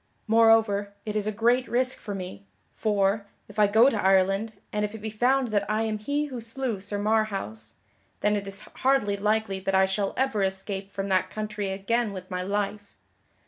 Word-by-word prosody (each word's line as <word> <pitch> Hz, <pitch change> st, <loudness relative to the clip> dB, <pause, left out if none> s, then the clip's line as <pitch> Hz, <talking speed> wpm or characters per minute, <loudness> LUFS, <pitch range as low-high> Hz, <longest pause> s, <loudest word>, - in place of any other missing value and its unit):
Moreover, 220 Hz, -3 st, +4 dB
it 210 Hz, -1 st, -4 dB
is 210 Hz, -1 st, 0 dB
a -, -, +1 dB
great 235 Hz, +4 st, +2 dB
risk 255 Hz, +2 st, 0 dB
for 205 Hz, -, -5 dB
me, 180 Hz, -, -7 dB, 0.3 s
for, 205 Hz, -1 st, +1 dB, 0.2 s
if 205 Hz, +1 st, -8 dB
I 210 Hz, -, +6 dB
go 220 Hz, +5 st, +6 dB
to 225 Hz, -7 st, +1 dB
Ireland, 195 Hz, +3 st, +3 dB, 0.2 s
and 210 Hz, 0 st, 0 dB
if 210 Hz, +1 st, -3 dB
it -, -, -5 dB
be 220 Hz, 0 st, -5 dB
found 250 Hz, +3 st, +2 dB
that 205 Hz, -1 st, 0 dB
I 215 Hz, +1 st, +1 dB
am 215 Hz, -1 st, -2 dB
he 285 Hz, +7 st, -1 dB
who 255 Hz, -5 st, -6 dB
slew 230 Hz, -1 st, -2 dB
Sir 205 Hz, +1 st, -3 dB
Marhaus, 200 Hz, -, -1 dB, 0.5 s
then 210 Hz, +1 st, +2 dB
it 200 Hz, -1 st, -3 dB
is 195 Hz, +1 st, -6 dB, 0.2 s
hardly 255 Hz, -7 st, +2 dB
likely 210 Hz, -1 st, 0 dB
that 195 Hz, 0 st, -1 dB
I 190 Hz, 0 st, +5 dB
shall 195 Hz, +1 st, -1 dB
ever 260 Hz, -6 st, +1 dB
escape 195 Hz, 0 st, -2 dB
from 195 Hz, 0 st, -4 dB
that 185 Hz, -1 st, +2 dB
country 215 Hz, -2 st, -4 dB
again 205 Hz, +3 st, -1 dB
with 185 Hz, -1 st, -9 dB
my 180 Hz, 0 st, -2 dB
life. 205 Hz, +1 st, -3 dB
210 Hz, 195 wpm, -26 LUFS, 195-225 Hz, 0.5 s, I